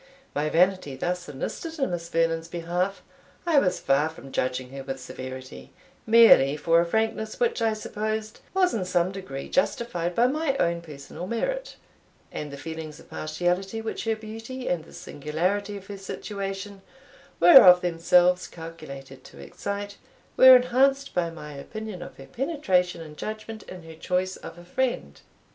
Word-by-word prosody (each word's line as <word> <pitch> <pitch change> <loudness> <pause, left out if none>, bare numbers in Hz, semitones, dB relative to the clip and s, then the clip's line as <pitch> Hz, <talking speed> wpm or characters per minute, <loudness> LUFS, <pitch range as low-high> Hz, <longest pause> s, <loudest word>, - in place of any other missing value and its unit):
My 150 +1 0
vanity 180 -4 +2
thus 180 +5 -3
enlisted 320 - -5
in 270 -9 0
Miss 170 -1 -4
Vernon's 165 0 0
behalf, 175 +3 -2 0.4
I 325 -4 +5
was 185 -7 0
far 140 +3 +2
from 140 -4 -12
judging 130 0 -2
her 135 0 -7
with 135 0 -5
severity, 130 +1 -9 0.3
merely 220 -12 +7
for 165 +3 +3
a 170 - -1
frankness 220 +2 -1
which 475 -1 +1
I 225 -1 +2
supposed 215 0 -4 0.2
was 370 -1 +3
in 205 - -1
some 180 0 +1
degree 185 -9 -7
justified 180 -10 -1
by 235 - +4
my 275 +1 0
own 170 0 +1
personal 155 +2 -9
merit; - - -2 0.6
and 150 - -5
the 140 - -7
feelings 160 0 -7
of - - -18
partiality, 180 +7 -1
which 225 +1 -4
her 225 0 +1
beauty, 225 +4 -8
and 165 -3 -1
the - - -16
singularity 185 +8 -2
of 195 - -11
her 200 0 -8
situation, 195 0 -6 0.6
were 275 -6 +10
of 180 -1 +8
themselves 180 +1 +3
calculated 140 -5 -10
to - - -14
excite, 200 - -5 0.4
were 260 0 +10
enhanced 270 +2 +3
by 175 -2 0
my 150 -2 -9
opinion 210 +6 -7
of 175 - -9
her - - -11
penetration 190 - 0
and 155 -2 -10
judgment 215 0 -6
in 180 -2 -9
her 165 0 -11
choice 185 +3 -1
of - - -10
a 175 - -13
friend. 210 - -2
180 Hz, 160 wpm, -26 LUFS, 160-220 Hz, 0.6 s, were